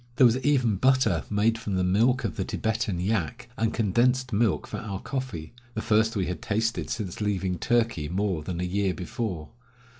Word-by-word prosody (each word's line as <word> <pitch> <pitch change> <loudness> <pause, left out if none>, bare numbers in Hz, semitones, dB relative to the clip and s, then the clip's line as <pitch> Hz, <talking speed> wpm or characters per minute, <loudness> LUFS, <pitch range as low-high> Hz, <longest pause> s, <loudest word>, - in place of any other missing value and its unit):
There 125 - +6
was 120 +1 +4
even 130 -7 +2
butter, 130 -8 +3
made 110 +2 +2
from 105 -4 -3
the 95 - +1
milk 115 +8 +3
of 100 -8 -2
the - - -1
Tibetan 110 -4 -1
yak, 95 -4 -2
and 110 0 0
condensed 125 +4 +1
milk 110 -1 +2
for - - -6
our 100 -3 -5
coffee, 125 - -5 0.2
the 110 - -1
first 110 +1 +2
we 95 -3 0
had 90 0 -4
tasted 115 +2 -1
since 105 -5 -4
leaving 95 -3 -1
Turkey, 115 -11 +1
more 95 -2 -1
than 85 +3 -4
a - - -1
year 95 +1 0
before. 90 -4 -4
105 Hz, 185 wpm, -27 LUFS, 90-115 Hz, 0.2 s, There